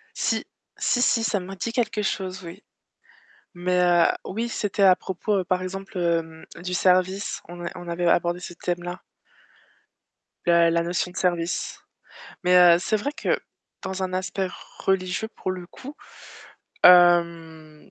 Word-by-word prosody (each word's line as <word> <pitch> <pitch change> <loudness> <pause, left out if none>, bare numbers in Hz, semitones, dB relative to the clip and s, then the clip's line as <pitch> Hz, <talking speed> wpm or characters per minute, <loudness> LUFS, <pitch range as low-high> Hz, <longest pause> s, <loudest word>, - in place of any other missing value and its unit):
Si. - - -1 0.3
Si, 245 - +1
si, 230 -2 +2
ça 215 -2 0
m'a 190 +1 -8
dit 210 +5 -3
quelque 230 -3 -1
chose 190 -2 -3
oui. 175 +4 -10 0.9
Mais, 180 +1 0
heu, 175 -1 +4 0.2
oui 225 +5 -3
c'était 205 -3 -1
à 185 -1 +7
propos 190 +1 -2
par 185 0 0
exemple, 195 +2 -7
heu, 165 -2 -1 0.2
du 180 0 -4
service, 185 +2 +1
on 175 0 -8
a - - -2
on 175 -1 -9
avait 170 +1 -2
abordé 175 +1 +2
ce 175 -1 -8
thème-là. 175 +1 -4 1.4
La 170 -1 +5
la 170 0 +1
notion 175 +1 -2
de - - -19
service. 175 -1 -1 0.6
Mais 180 0 +4
heu, 175 -1 +7
c'est 215 +4 0
vrai 275 +8 -3
que - - -1 0.4
dans 190 0 -4
un 185 0 -3
aspect 185 +1 -2 0.3
religieux 190 +2 -1
pour 190 - -5
le 180 -1 -6
coup. 275 +10 -11 0.9
Hem 170 -3 +4
180 Hz, 150 wpm, -24 LUFS, 175-190 Hz, 1.4 s, à